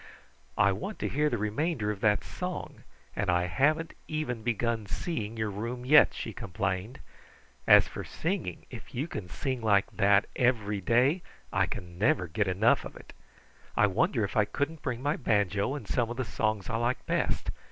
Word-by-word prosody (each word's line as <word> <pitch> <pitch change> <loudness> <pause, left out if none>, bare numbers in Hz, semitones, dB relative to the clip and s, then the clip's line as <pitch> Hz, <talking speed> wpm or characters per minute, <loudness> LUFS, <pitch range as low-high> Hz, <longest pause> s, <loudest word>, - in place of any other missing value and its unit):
"I 100 +2 +5
want 110 - -4
to - - -2
hear 150 +2 +1
the 120 - -1
remainder 110 +2 -1
of 100 -2 -7
that 105 -2 +3
song, - - -6 0.3
and 100 -2 -1
I 90 0 +3
hadn't 150 - +1
even 150 -7 -3
begun 115 -1 -1
seeing 115 - -3
your 110 -2 -1
room 120 +5 -5
yet," 150 +2 +7
she - - -5
complained. 95 +6 -3 0.7
"As - - +8
for - - -6
singing, 165 - -3
if - - -10
you 140 +6 -1
can 100 - -6
sing 120 +8 -3
like 100 -3 +3
that 100 0 +4
every 110 -5 +1
day, 125 - +3 0.3
I - - +2
never 90 +1 0
can 80 - -14
get 105 +1 +1
enough 95 +5 +3
of - - -9
it. - - -13 0.6
I - - +6
wonder 105 +3 +1
if 100 - -3
I 105 - +5
couldn't 145 +9 -3
bring 130 -2 -3
my 145 +2 +1
banjo 105 - +1
and 125 -8 -7
some 120 -3 0
of 120 - -5
the 130 - -1
songs 110 -3 -1
I 115 - -1
like 120 +2 -1
best. - - 0
110 Hz, 185 wpm, -29 LUFS, 100-130 Hz, 0.7 s, As